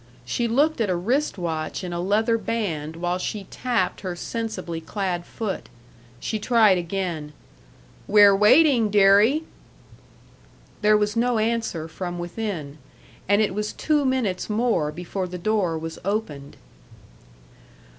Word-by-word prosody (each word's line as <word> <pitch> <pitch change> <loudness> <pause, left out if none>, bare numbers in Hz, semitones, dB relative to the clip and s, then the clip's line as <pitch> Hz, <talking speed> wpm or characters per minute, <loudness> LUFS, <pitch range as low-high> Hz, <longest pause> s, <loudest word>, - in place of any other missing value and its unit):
She 235 - -1
looked 285 +4 +2
at 210 - +1
a 180 - +1
wrist 240 +10 0
watch 165 0 -3
in 180 -1 -4
a 170 - -3
leather 220 +5 +1
band 165 -10 -3
while 175 +2 -2
she 205 +2 -4
tapped 235 -7 -1
her 185 -2 -4
sensibly 185 -5 -4
clad 180 -1 -3
foot. 215 -4 -5 0.5
She 220 - -3
tried 215 -4 +4
again: 170 -4 -4 0.7
"We're 205 -1 +7
waiting, 240 +2 +5
deary!" 205 +9 +5 1.4
There 210 0 +5
was 210 0 0
no 240 +1 +1
answer 220 -7 -1
from 175 +1 -5
within, 175 -5 -5 0.5
and 205 +2 +4
it 205 - -1
was 210 +1 -3
two 300 -2 +1
minutes 255 -9 -1
more 210 -9 +1
before 180 +3 -4
the 180 0 -6
door 185 -3 0
was 160 0 -6
opened. 165 -9 -4
200 Hz, 135 wpm, -24 LUFS, 175-225 Hz, 1.4 s, We're